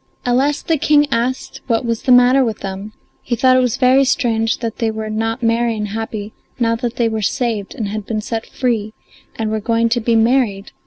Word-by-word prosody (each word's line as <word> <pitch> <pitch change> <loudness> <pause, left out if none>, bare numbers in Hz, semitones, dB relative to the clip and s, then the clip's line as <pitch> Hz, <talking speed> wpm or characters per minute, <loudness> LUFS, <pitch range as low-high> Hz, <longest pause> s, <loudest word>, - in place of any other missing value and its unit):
At 245 0 +2
last 285 +3 0
the 325 -3 +1
King 295 -1 +4
asked 245 +3 -2
what 230 -1 0
was 230 -1 -2
the 255 - +1
matter 250 +2 +6
with 225 -4 -3
them; 195 +2 -6 0.3
he 240 - -2
thought 255 +2 +4
it - - +5
was 250 -3 0
very 260 +1 +4
strange 230 -4 +1
that 230 -2 -5
they 230 - 0
were 220 0 -4
not 225 +2 -2
merry 230 0 +1
and 210 -1 -3
happy 215 0 -5 0.2
now 230 -2 +1
that 240 -1 -3
they 235 - +1
were 220 -1 -2
saved 215 -1 -2
and 215 - -3
had 210 -1 -5
been 220 -2 -2
set 225 +1 -4
free 225 -4 -2 0.4
and 220 -1 -2
were 220 - -1
going 230 +2 +1
to 240 +1 0
be 230 +1 +1
married. 225 -4 +1
230 Hz, 220 wpm, -18 LUFS, 220-250 Hz, 0.4 s, matter